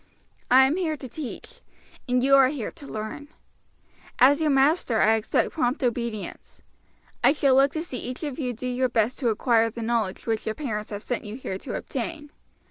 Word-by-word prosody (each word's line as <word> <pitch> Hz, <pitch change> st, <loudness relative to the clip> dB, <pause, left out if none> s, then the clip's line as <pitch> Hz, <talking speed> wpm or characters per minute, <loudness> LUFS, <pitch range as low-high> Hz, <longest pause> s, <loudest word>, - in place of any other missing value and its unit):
I 260 Hz, +1 st, +7 dB
am 285 Hz, +6 st, +1 dB
here 320 Hz, -5 st, -1 dB
to 260 Hz, -, -8 dB
teach, 255 Hz, +2 st, -8 dB, 0.5 s
and 250 Hz, 0 st, +2 dB
you 275 Hz, +1 st, +6 dB
are 270 Hz, -1 st, +7 dB
here 260 Hz, -5 st, -4 dB
to 295 Hz, -4 st, -13 dB
learn. 220 Hz, +7 st, -6 dB, 0.9 s
As 280 Hz, +5 st, +5 dB
your 310 Hz, -, +2 dB
master 270 Hz, -4 st, +3 dB
I 220 Hz, -, +5 dB
expect 220 Hz, -1 st, 0 dB
prompt 265 Hz, -2 st, -1 dB
obedience. 235 Hz, -3 st, -4 dB, 0.6 s
I 260 Hz, +4 st, +6 dB
shall 280 Hz, -3 st, +3 dB
look 275 Hz, +1 st, +5 dB
to 315 Hz, -, -2 dB
see 260 Hz, -8 st, -6 dB
each 250 Hz, +5 st, -6 dB
of 290 Hz, -2 st, -4 dB
you 255 Hz, -4 st, -1 dB
do 245 Hz, +2 st, -7 dB
your 250 Hz, +1 st, 0 dB
best 230 Hz, +1 st, 0 dB
to 250 Hz, -4 st, +1 dB
acquire 230 Hz, +1 st, +2 dB
the 230 Hz, +1 st, -7 dB
knowledge 225 Hz, -4 st, -1 dB
which 225 Hz, -1 st, -2 dB
your 220 Hz, -, -1 dB
parents 215 Hz, -8 st, -4 dB
have 205 Hz, 0 st, -6 dB
sent 245 Hz, -, -3 dB
you 210 Hz, +1 st, -7 dB
here 190 Hz, -7 st, -5 dB
to -, -, -6 dB
obtain. 295 Hz, -2 st, -5 dB
250 Hz, 200 wpm, -25 LUFS, 225-280 Hz, 0.9 s, I